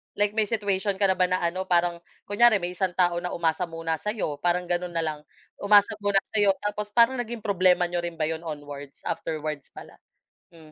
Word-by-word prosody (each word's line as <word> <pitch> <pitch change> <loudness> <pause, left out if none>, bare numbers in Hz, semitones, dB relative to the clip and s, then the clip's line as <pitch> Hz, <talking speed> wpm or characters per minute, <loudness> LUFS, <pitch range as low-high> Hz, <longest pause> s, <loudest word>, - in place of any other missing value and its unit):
Like 205 0 +2
may 215 -1 +1
situation 200 -2 -1
ka 195 -1 +3
na 185 - -1
ba 185 - +4
na 185 -1 -1
ano 185 +2 -2
parang 175 -1 +2 0.2
kunyari 220 +2 +4
may 180 -2 -2
isang 180 -1 -2
tao 175 -1 +2
na 180 0 -4
umasa 170 +1 0
muna 165 -1 -3
sa'yo 195 -7 -3
parang 175 +1 +1
gano'n 175 0 -3
na 165 - +1
lang, 155 -1 -3 0.4
umasa 205 0 +5
muna 205 -1 -1 0.2
sa'yo 205 -3 +3
tapos 205 0 -2
parang 235 +4 +3
naging 235 -2 -5
problema 185 -3 +3
n'yo 175 0 -1
rin 170 -1 -4
ba 160 - -2
'yon 160 +2 -3
onwards? 145 -2 -8
Afterwards 155 -3 -4
pala. - - -12 0.6
M 165 - -15
180 Hz, 200 wpm, -26 LUFS, 165-205 Hz, 0.6 s, umasa